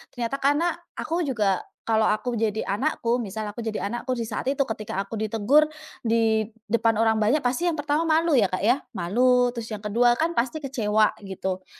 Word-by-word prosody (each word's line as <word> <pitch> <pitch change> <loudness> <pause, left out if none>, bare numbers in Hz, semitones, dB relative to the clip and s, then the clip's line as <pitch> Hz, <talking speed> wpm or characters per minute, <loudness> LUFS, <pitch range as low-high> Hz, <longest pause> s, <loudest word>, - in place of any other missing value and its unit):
Ternyata 245 +3 -2
karena, 295 +5 +2 0.2
aku 330 -1 -2
juga 205 -7 +1 0.3
kalau 220 -1 +3
aku 225 +3 0
jadi 220 -1 0
anakku, 240 +1 0
misal 215 -1 -4
aku 230 +2 -7
jadi 220 -1 -3
anakku 240 +2 -3
di 235 - -3
saat 225 +1 -4
itu 275 +1 0
ketika 215 -6 -2
aku 200 +3 -6
ditegur 225 +7 +3 0.4
di 225 -1 +2 0.2
depan 230 0 +3
orang 225 -1 +3
banyak, 225 +8 +2
pasti 250 +7 0
yang 345 - +2
pertama 300 +1 0
malu 320 -2 +3
ya, 220 - +5
Kak 185 -1 -2
ya, 240 +6 +3 0.2
malu, 245 +7 +3
terus 235 -2 -6
yang 210 - -6
ke-2 235 +4 +3
kan 325 +6 -1
pasti 260 +6 0
kecewa 220 -6 +1
gitu. 190 -1 -4
230 Hz, 190 wpm, -25 LUFS, 215-270 Hz, 0.4 s, ya